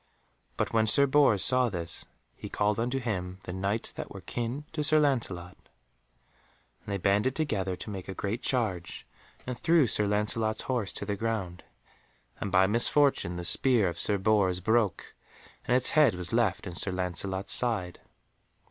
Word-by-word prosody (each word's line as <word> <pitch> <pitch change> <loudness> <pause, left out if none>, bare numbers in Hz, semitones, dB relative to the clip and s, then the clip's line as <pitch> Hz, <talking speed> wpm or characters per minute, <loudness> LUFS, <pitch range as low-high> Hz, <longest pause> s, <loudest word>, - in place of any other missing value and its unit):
But - - -2
when 110 -1 +2
Sir 140 +6 +6
Bors 135 -8 +3
saw 125 -1 +3
this, 85 -4 -3 0.3
he - - -9
called 105 0 0
unto 125 +3 -1
him 95 -7 -4
the 90 - -7
Knights 100 +4 -2
that - - -7
were - - -10
of 95 - -13
kin 120 +8 -4
to 150 -2 -3
Sir 155 +1 +4
Lancelot, 105 -12 0 1.2
and - - -32
they 100 -1 -2
banded 100 +7 +1
together 100 - -2
to 90 - -9
make 95 -2 -7
a 95 - -5
great 105 +5 -3
charge, 95 -10 -2 0.4
and 125 - -4
threw 165 +3 +3
Sir 105 -3 0
Lancelot's 110 +1 -1
horse 120 -6 -2
to - - -5
the 100 0 -2
ground, 100 -5 -4 0.8
and 100 - -4
by 95 +1 +5
misfortune 115 -2 +1
the 90 0 -5
spear 115 +2 +3
of 85 0 -7
Sir 105 - 0
Bors 95 -2 +1
broke, 110 -1 0 0.5
and 125 - +4
its 130 - +2
head 150 -9 +4
was 90 +2 -3
left 115 -6 +1
in 90 - -6
Sir 95 +3 0
Lancelot's 95 +1 -2
side. 105 -8 +2
105 Hz, 175 wpm, -28 LUFS, 95-120 Hz, 1.2 s, Sir